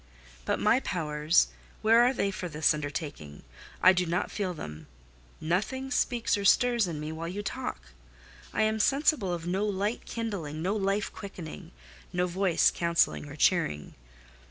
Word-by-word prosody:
"But -, -, +1 dB
my 230 Hz, +4 st, +4 dB
powers—where 150 Hz, -, +1 dB
are 245 Hz, +1 st, +5 dB
they 200 Hz, -6 st, -1 dB
for 180 Hz, -2 st, -5 dB
this 150 Hz, 0 st, +3 dB
undertaking? 145 Hz, -, -6 dB, 0.4 s
I 185 Hz, -, +8 dB
do 180 Hz, -1 st, 0 dB
not 170 Hz, +2 st, -1 dB
feel 190 Hz, -4 st, -2 dB
them. 75 Hz, -, -8 dB, 0.5 s
Nothing 220 Hz, +11 st, -2 dB
speaks 240 Hz, -4 st, +1 dB
or -, -, -3 dB
stirs 235 Hz, +1 st, +4 dB
in 160 Hz, -3 st, -4 dB
me 150 Hz, +1 st, -4 dB
while 160 Hz, +1 st, -5 dB
you 200 Hz, +4 st, -4 dB
talk. 195 Hz, -, -4 dB, 0.7 s
I -, -, +1 dB
am 220 Hz, 0 st, +1 dB
sensible 275 Hz, -, +2 dB
of 170 Hz, -1 st, -4 dB
no 185 Hz, +3 st, 0 dB
light 205 Hz, +2 st, -2 dB
kindling—no 190 Hz, -5 st, -3 dB
life 200 Hz, 0 st, -1 dB
quickening—no 180 Hz, -1 st, -7 dB
voice 180 Hz, 0 st, +2 dB
counselling 170 Hz, -3 st, +1 dB
or 145 Hz, -, -8 dB
cheering. 155 Hz, -, +1 dB
180 Hz, 145 wpm, -29 LUFS, 155-210 Hz, 0.7 s, I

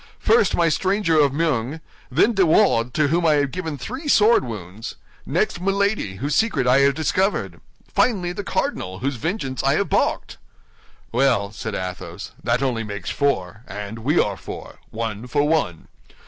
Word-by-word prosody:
First, 220 Hz, -3 st, +3 dB
my 170 Hz, -, +3 dB
stranger 185 Hz, 0 st, +2 dB
of 145 Hz, -2 st, +4 dB
Meung; 145 Hz, -2 st, -1 dB, 0.3 s
then 165 Hz, -, +3 dB
De 195 Hz, -, +2 dB
Wardes, 155 Hz, -, +3 dB
to 150 Hz, -2 st, +2 dB
whom 170 Hz, +3 st, +1 dB
I 160 Hz, -2 st, +4 dB
have 140 Hz, -2 st, +1 dB
given 165 Hz, -5 st, -4 dB
three 255 Hz, -, -6 dB
sword 230 Hz, -, +5 dB
wounds; 105 Hz, -3 st, -7 dB, 0.3 s
next 175 Hz, +4 st, 0 dB
Milady, 195 Hz, -, 0 dB
whose 140 Hz, +9 st, -2 dB
secret 195 Hz, -, +2 dB
I 125 Hz, +2 st, +5 dB
have 140 Hz, 0 st, +4 dB
discovered; 185 Hz, +6 st, 0 dB, 0.3 s
finally, 185 Hz, -8 st, +1 dB
the 200 Hz, +3 st, -5 dB
cardinal, 95 Hz, -, -2 dB
whose 135 Hz, -1 st, -1 dB
vengeance 135 Hz, -, -3 dB
I -, -, +2 dB
have -, -, 0 dB
balked." -, -, 0 dB, 0.7 s
"Well," 120 Hz, -5 st, +2 dB
said 110 Hz, -1 st, -5 dB
Athos, 90 Hz, 0 st, -6 dB
"that 120 Hz, +2 st, +1 dB
only 120 Hz, -4 st, 0 dB
makes 100 Hz, -2 st, -5 dB
four; 100 Hz, -9 st, -1 dB
and 105 Hz, +3 st, -6 dB
we 145 Hz, +9 st, +1 dB
are 100 Hz, -2 st, +1 dB
four—one 115 Hz, 0 st, -7 dB
for 145 Hz, +3 st, +1 dB
one. 150 Hz, -, 0 dB
140 Hz, 160 wpm, -22 LUFS, 115-180 Hz, 0.7 s, sword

